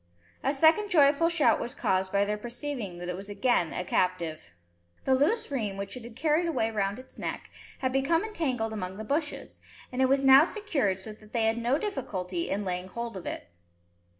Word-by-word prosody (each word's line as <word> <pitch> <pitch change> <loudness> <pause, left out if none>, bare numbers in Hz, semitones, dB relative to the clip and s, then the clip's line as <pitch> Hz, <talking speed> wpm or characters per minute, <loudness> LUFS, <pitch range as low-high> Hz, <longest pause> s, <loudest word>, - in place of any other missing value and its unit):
A 270 - +2
second 320 +8 +4
joyful 305 -1 +5
shout 335 -3 +3
was 240 - -5
caused 190 0 0
by 200 0 +3
their 210 +1 -1
perceiving 235 -3 -5
that 175 0 -6
it 180 - -2
was 195 +2 -8
again 205 -5 +1
a 180 - -3
captive. 170 - -1 0.6
The 265 - +3
loose 295 - +2
rheim, 215 -8 -2
which 200 +3 -5
it 250 - -8
had 235 -1 -10
carried 310 +5 +2
away 225 -9 0
round 200 -2 -1
its 255 +1 -13
neck, - - -5 0.3
had 260 -1 0
become 275 +7 +2
entangled 260 - -2
among 190 -2 -5
the 220 - -5
bushes, 295 +5 -3 0.3
and 255 +1 -1
it 260 - +4
was 275 0 +3
now 270 +2 +9
secured 305 - -1
so 215 +3 -8
that 215 0 -18
they 230 -2 +2
had 225 +1 +1
no 240 +4 +2
difficulty 185 - -3
in 200 +1 -1
laying 180 0 -3
hold 235 +3 -5
of 185 - -7
it. 85 - -6
235 Hz, 205 wpm, -28 LUFS, 195-285 Hz, 0.6 s, now